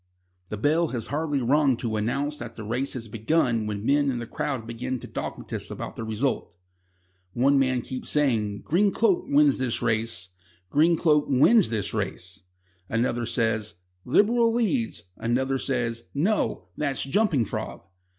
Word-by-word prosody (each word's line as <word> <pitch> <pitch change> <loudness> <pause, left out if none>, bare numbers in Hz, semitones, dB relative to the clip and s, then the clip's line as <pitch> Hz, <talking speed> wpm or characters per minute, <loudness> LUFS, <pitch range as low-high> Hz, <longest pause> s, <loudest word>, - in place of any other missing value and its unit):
The 105 - -4
bell 155 +9 +2
has 120 -6 -5
hardly 145 -3 0
rung 135 0 +3
to 115 -2 -2
announce 140 +8 -1
that 120 -1 -7
the 115 - -7
race 120 +6 -2
has 115 -3 -6
begun 115 0 +1
when 105 0 -4
men 145 +1 +3
in 125 - -1
the 120 - -4
crowd 125 0 -3
begin 125 +3 -4
to - - -9
dogmatise - - -5
about - - -6
the - - -5
result. 110 -4 -2 0.8
One 135 +3 +3
man 130 -2 +1
keeps 130 -1 -6
saying: 110 -9 0
"Green 195 +5 +2
Cloak 350 - +2
wins 290 0 +4
this 125 -3 0
race. 110 -6 -1 0.4
Green 165 +3 +4
Cloak 150 -3 +3
wins 160 - +5
this 105 -3 -2
race." 95 -3 -4 0.5
Another 120 0 0
says: 115 -2 -1 0.3
"Liberal 230 - +3
leads." 235 - 0
Another 130 +3 0
says: 115 -4 -2
"No; 155 - 0
that's 140 -3 -1
Jumping 145 - +2
Frog." - - -5
130 Hz, 155 wpm, -26 LUFS, 115-150 Hz, 0.8 s, wins